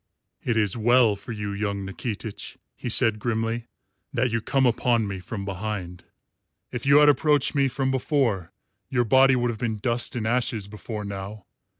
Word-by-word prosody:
"It 120 Hz, -3 st, 0 dB
is 105 Hz, -3 st, +2 dB
well 120 Hz, -1 st, +4 dB
for 100 Hz, +4 st, -9 dB
you, 105 Hz, -2 st, -4 dB
young 100 Hz, -1 st, -2 dB
Nikitich," 105 Hz, +2 st, -6 dB, 0.2 s
he 120 Hz, -, -5 dB
said 115 Hz, -2 st, +2 dB
grimly, 115 Hz, +1 st, -2 dB, 0.4 s
"that 125 Hz, 0 st, 0 dB
you 115 Hz, 0 st, 0 dB
come 135 Hz, +3 st, +1 dB
upon 120 Hz, -2 st, +2 dB
me 100 Hz, -1 st, -4 dB
from 100 Hz, +2 st, -6 dB
behind. 95 Hz, -3 st, -5 dB, 0.7 s
If 125 Hz, +1 st, -5 dB
you 140 Hz, +1 st, +7 dB
had 150 Hz, 0 st, +7 dB
approached 145 Hz, 0 st, +3 dB
me 140 Hz, -2 st, +3 dB
from 130 Hz, +1 st, -1 dB
before, 125 Hz, -, 0 dB, 0.4 s
your 120 Hz, -2 st, +1 dB
body 135 Hz, +3 st, +5 dB
would 120 Hz, -1 st, +1 dB
have 110 Hz, -, -8 dB
been 115 Hz, -3 st, -1 dB
dust 120 Hz, +3 st, -1 dB
and 115 Hz, -3 st, -2 dB
ashes 115 Hz, -3 st, 0 dB
before 105 Hz, +1 st, -6 dB
now. 100 Hz, 0 st, -7 dB
115 Hz, 175 wpm, -25 LUFS, 105-125 Hz, 0.7 s, you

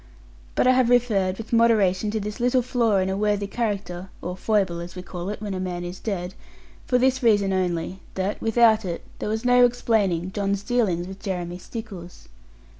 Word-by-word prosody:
But -, -, +2 dB
I 255 Hz, -, +6 dB
have 255 Hz, -2 st, +3 dB
referred, 210 Hz, -7 st, +2 dB
with 225 Hz, +1 st, -8 dB
moderation, 215 Hz, -4 st, +3 dB
to 220 Hz, +1 st, -1 dB
this 210 Hz, +2 st, -5 dB
little 245 Hz, +1 st, +2 dB
flaw 235 Hz, -4 st, +1 dB
in 190 Hz, 0 st, +1 dB
a 190 Hz, -, -1 dB
worthy 205 Hz, 0 st, 0 dB
character 195 Hz, -4 st, -3 dB
(or 180 Hz, +1 st, -5 dB
foible, 190 Hz, -4 st, 0 dB
as 170 Hz, +1 st, -8 dB
we 180 Hz, -, -7 dB
call 180 Hz, +1 st, -6 dB
it, 210 Hz, -, -4 dB
when 205 Hz, -2 st, -3 dB
a 185 Hz, -, -3 dB
man 180 Hz, -1 st, -3 dB
is 175 Hz, +1 st, -6 dB
dead) 185 Hz, -4 st, -3 dB, 0.5 s
for 250 Hz, -, +3 dB
this 260 Hz, +1 st, +2 dB
reason 205 Hz, -5 st, +3 dB
only 180 Hz, 0 st, -1 dB, 0.2 s
that 190 Hz, +2 st, -2 dB
without 225 Hz, -1 st, +4 dB
it 175 Hz, -3 st, -4 dB, 0.2 s
there -, -, -3 dB
was 220 Hz, +2 st, -2 dB
no 245 Hz, 0 st, +6 dB
explaining 205 Hz, -7 st, +1 dB
John's 200 Hz, 0 st, -1 dB
dealings 205 Hz, -8 st, 0 dB
with 190 Hz, +1 st, -9 dB
Jeremy 180 Hz, -2 st, -4 dB
Stickles. 190 Hz, -5 st, -9 dB
200 Hz, 190 wpm, -24 LUFS, 185-230 Hz, 0.5 s, I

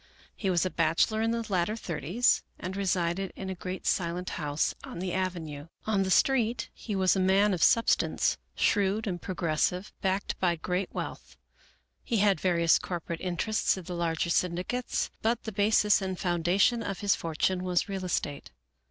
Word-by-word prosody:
He 195 Hz, -, -2 dB
was 175 Hz, -1 st, +2 dB
a 185 Hz, -, -1 dB
bachelor 165 Hz, +7 st, +2 dB
in 225 Hz, -, +1 dB
the 230 Hz, 0 st, -1 dB
latter 190 Hz, +2 st, 0 dB
thirties, 185 Hz, -, +1 dB, 0.2 s
and 185 Hz, +2 st, -5 dB
resided 185 Hz, -1 st, 0 dB
in 190 Hz, 0 st, -5 dB
a -, -, -2 dB
great 185 Hz, +1 st, -6 dB
silent 180 Hz, 0 st, -1 dB
house 145 Hz, -1 st, -1 dB
on -, -, -8 dB
the 180 Hz, 0 st, -3 dB
avenue. 170 Hz, -6 st, -3 dB, 0.2 s
On 215 Hz, -3 st, +1 dB
the 190 Hz, -, 0 dB
street 235 Hz, +2 st, +2 dB
he 210 Hz, -, -5 dB
was 190 Hz, 0 st, +3 dB
a -, -, +1 dB
man 195 Hz, +2 st, +4 dB
of 175 Hz, -, -2 dB
substance, 230 Hz, -, +3 dB, 0.2 s
shrewd 205 Hz, +1 st, +2 dB
and 180 Hz, -4 st, -3 dB
progressive, 180 Hz, +1 st, -1 dB
backed 190 Hz, +1 st, -1 dB
by 175 Hz, -2 st, +2 dB
great 180 Hz, +3 st, -2 dB
wealth. -, -, -6 dB, 0.7 s
He 235 Hz, -, -1 dB
had 200 Hz, -4 st, +3 dB
various 170 Hz, -3 st, +3 dB
corporate 170 Hz, -2 st, -5 dB
interests 190 Hz, +4 st, 0 dB
in 185 Hz, -, -7 dB
the 180 Hz, -, -6 dB
larger 170 Hz, 0 st, -1 dB
syndicates, 180 Hz, +9 st, -1 dB
but 230 Hz, +1 st, 0 dB
the 220 Hz, -, -4 dB
basis 210 Hz, 0 st, +3 dB
and 190 Hz, -1 st, -3 dB
foundation 180 Hz, +7 st, +2 dB
of 195 Hz, -4 st, -4 dB
his 205 Hz, -1 st, +3 dB
fortune 175 Hz, +3 st, -1 dB
was 180 Hz, -1 st, +1 dB
real 195 Hz, -2 st, -4 dB
estate. 145 Hz, -5 st, -3 dB
185 Hz, 170 wpm, -29 LUFS, 175-205 Hz, 0.7 s, man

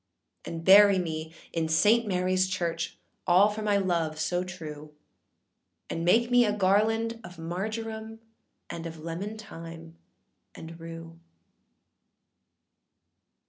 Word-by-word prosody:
âAnd 165 Hz, -1 st, -6 dB
bury 200 Hz, +2 st, +8 dB
me 160 Hz, -3 st, -3 dB, 0.2 s
in 165 Hz, -1 st, 0 dB
Saint 215 Hz, +8 st, +4 dB
Maryâs 185 Hz, 0 st, +1 dB
Church, 170 Hz, -3 st, -3 dB, 0.3 s
All 185 Hz, +4 st, +6 dB
for 210 Hz, +1 st, -5 dB
my 205 Hz, -1 st, +2 dB
love 170 Hz, -5 st, -1 dB
so 175 Hz, +3 st, 0 dB
true; 155 Hz, -4 st, -9 dB, 1.0 s
And 165 Hz, -, -3 dB
make 235 Hz, +8 st, +3 dB
me 245 Hz, 0 st, +6 dB
a 210 Hz, -, +1 dB
garland 215 Hz, +3 st, +1 dB
of 180 Hz, -4 st, -11 dB
marjoram, 220 Hz, +6 st, -5 dB, 0.5 s
And 165 Hz, 0 st, -6 dB
of 165 Hz, 0 st, -9 dB
lemon 170 Hz, +7 st, -5 dB
thyme, 165 Hz, -5 st, -10 dB, 0.6 s
and 165 Hz, +1 st, -10 dB
rue. 165 Hz, 0 st, -9 dB
180 Hz, 115 wpm, -28 LUFS, 165-210 Hz, 1.0 s, bury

